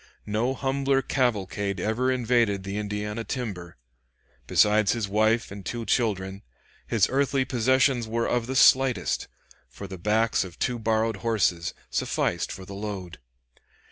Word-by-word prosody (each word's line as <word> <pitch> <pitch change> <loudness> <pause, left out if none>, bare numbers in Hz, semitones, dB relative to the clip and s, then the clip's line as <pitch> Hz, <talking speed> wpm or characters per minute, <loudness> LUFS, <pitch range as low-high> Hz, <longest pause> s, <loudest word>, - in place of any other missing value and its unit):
No 115 +5 0
humbler 135 0 0
cavalcade 100 -6 -1
ever 110 +7 0
invaded 120 -5 +1
the 100 +1 -5
Indiana 105 +2 -3
timber. 95 - -5 0.7
Besides 105 -1 +4
his 115 -4 -2
wife 110 +3 +1
and 100 0 -8
two 115 +4 -4
children, 100 -5 -1 0.5
his 110 -4 +3
earthly 135 0 +1
possessions 130 0 +2
were 115 +1 -1
of 120 -1 0
the 130 - -3
slightest, 130 -1 +4 0.4
for 60 +11 -9
the 95 -2 -8
backs 110 +4 +2
of 90 -3 -10
two 125 -1 -1
borrowed 110 -1 0
horses 95 -5 0 0.2
sufficed - - -1
for 95 - -8
the 100 - -9
load. 100 -3 -6
110 Hz, 140 wpm, -26 LUFS, 100-125 Hz, 0.7 s, Besides